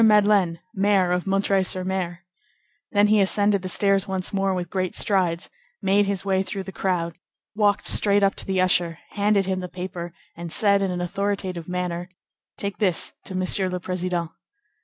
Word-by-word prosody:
Madeleine, 205 Hz, -5 st, +4 dB
Mayor 195 Hz, -2 st, +2 dB
of 180 Hz, +2 st, -1 dB
M. 195 Hz, 0 st, +2 dB
sur 190 Hz, -2 st, +1 dB
M._; 185 Hz, -2 st, -2 dB, 0.7 s
then 205 Hz, 0 st, +4 dB
he 210 Hz, 0 st, +4 dB
ascended 200 Hz, 0 st, +2 dB
the 185 Hz, -, -3 dB
stairs 195 Hz, +1 st, +2 dB
once 190 Hz, 0 st, -2 dB
more 195 Hz, 0 st, +1 dB
with 180 Hz, -1 st, -4 dB
great 185 Hz, -2 st, -2 dB
strides, 180 Hz, -5 st, +1 dB, 0.3 s
made 200 Hz, +1 st, +2 dB
his 200 Hz, -1 st, -1 dB
way 190 Hz, -1 st, +2 dB
through 195 Hz, 0 st, -4 dB
the 190 Hz, -, -8 dB
crowd, 175 Hz, -4 st, -1 dB, 0.4 s
walked 205 Hz, -1 st, +2 dB
straight 205 Hz, -1 st, +4 dB
up 195 Hz, -, +3 dB
to -, -, -5 dB
the 190 Hz, -1 st, 0 dB
usher, 175 Hz, -2 st, +2 dB
handed 205 Hz, -1 st, +2 dB
him 190 Hz, 0 st, -1 dB
the 180 Hz, -1 st, -6 dB
paper, 180 Hz, -1 st, -6 dB, 0.2 s
and 170 Hz, 0 st, -7 dB
said 200 Hz, +1 st, +3 dB
in 195 Hz, -, 0 dB
an 180 Hz, -1 st, -3 dB
authoritative 185 Hz, -1 st, -3 dB
manner:— 180 Hz, -1 st, -3 dB, 0.5 s
"Take 200 Hz, -1 st, -4 dB
this 185 Hz, -6 st, 0 dB
to 190 Hz, -, -6 dB
Monsieur 185 Hz, +1 st, +1 dB
le 180 Hz, 0 st, -3 dB
Président." 180 Hz, -2 st, -2 dB
190 Hz, 180 wpm, -24 LUFS, 180-200 Hz, 0.7 s, Madeleine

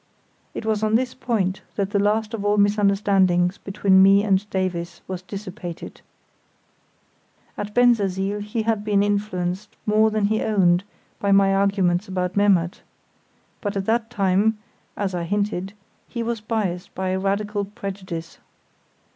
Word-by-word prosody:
It -, -, -5 dB
was 215 Hz, -1 st, 0 dB
on 215 Hz, 0 st, +2 dB
this 250 Hz, +2 st, +1 dB
point 195 Hz, -6 st, -1 dB
that 200 Hz, -1 st, -1 dB
the 205 Hz, -, +1 dB
last 215 Hz, +2 st, +1 dB
of 215 Hz, -3 st, -3 dB
all 205 Hz, 0 st, +2 dB
misunderstandings 200 Hz, -3 st, +2 dB
between 195 Hz, -1 st, +3 dB
me 195 Hz, +1 st, +6 dB
and 200 Hz, 0 st, +1 dB
Davies 175 Hz, -3 st, -3 dB
was 185 Hz, -1 st, -5 dB
dissipated. 185 Hz, -2 st, -8 dB, 1.5 s
At 205 Hz, 0 st, -6 dB
Bensersiel 205 Hz, -5 st, +2 dB
he 210 Hz, +2 st, -3 dB
had 220 Hz, -2 st, 0 dB
been 205 Hz, -1 st, +2 dB
influenced 200 Hz, -2 st, -2 dB
more 215 Hz, +1 st, +4 dB
than 215 Hz, -1 st, 0 dB
he 215 Hz, +1 st, +1 dB
owned 185 Hz, -4 st, +3 dB, 0.4 s
by 200 Hz, -, 0 dB
my 195 Hz, 0 st, +5 dB
arguments 195 Hz, -1 st, +1 dB
about 180 Hz, -1 st, -2 dB
Memmert; 190 Hz, -4 st, +2 dB, 0.8 s
but 205 Hz, -1 st, -2 dB
at 195 Hz, -, -2 dB
that 225 Hz, +1 st, 0 dB
time 205 Hz, 0 st, +2 dB, 0.4 s
(as 195 Hz, -2 st, -2 dB
I 175 Hz, -, -2 dB
hinted) 200 Hz, +1 st, -2 dB, 0.4 s
he 235 Hz, -2 st, -3 dB
was 230 Hz, -1 st, -3 dB
biased 200 Hz, -5 st, -3 dB
by 190 Hz, 0 st, -2 dB
a 185 Hz, 0 st, 0 dB
radical 200 Hz, +1 st, -1 dB
prejudice. 190 Hz, -4 st, -7 dB
200 Hz, 145 wpm, -23 LUFS, 190-210 Hz, 1.5 s, me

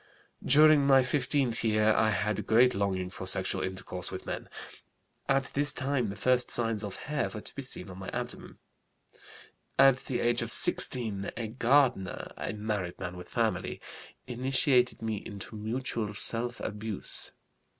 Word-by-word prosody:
"During 150 Hz, 0 st, +6 dB
my 135 Hz, -1 st, +6 dB
fifteenth 130 Hz, -3 st, 0 dB
year 110 Hz, -1 st, +3 dB
I 110 Hz, 0 st, +3 dB
had 105 Hz, 0 st, -1 dB
great 125 Hz, +3 st, +5 dB
longing 95 Hz, -2 st, -1 dB
for 95 Hz, 0 st, -7 dB
sexual 95 Hz, 0 st, -1 dB
intercourse 95 Hz, -1 st, -4 dB
with 95 Hz, -, -7 dB
men. -, -, -5 dB, 0.8 s
At 135 Hz, -1 st, +1 dB
this 145 Hz, 0 st, +3 dB
time 130 Hz, -4 st, -1 dB
the 100 Hz, -, -5 dB
first 125 Hz, +2 st, +2 dB
signs 115 Hz, -3 st, 0 dB
of 100 Hz, -2 st, -5 dB
hair 150 Hz, -1 st, -1 dB
were 105 Hz, -, -7 dB
to -, -, -6 dB
be 140 Hz, -, -4 dB
seen 125 Hz, -7 st, -5 dB
on 95 Hz, -1 st, -10 dB
my 95 Hz, -, -7 dB
abdomen. -, -, -6 dB, 1.2 s
"At 135 Hz, -1 st, +6 dB
the 130 Hz, -2 st, -3 dB
age 120 Hz, 0 st, +1 dB
of -, -, -4 dB
16 105 Hz, -6 st, +3 dB
a 115 Hz, -1 st, -3 dB
gardener, 125 Hz, -5 st, +1 dB
a -, -, -4 dB
married 105 Hz, -4 st, -3 dB
man 90 Hz, -1 st, -6 dB
with 90 Hz, 0 st, -10 dB
family, -, -, -1 dB, 0.5 s
initiated 125 Hz, 0 st, +1 dB
me 110 Hz, -1 st, -2 dB
into 100 Hz, +1 st, -8 dB
mutual 110 Hz, -1 st, -3 dB
self 120 Hz, +3 st, 0 dB
abuse. 105 Hz, -1 st, -3 dB
115 Hz, 155 wpm, -29 LUFS, 100-130 Hz, 1.2 s, During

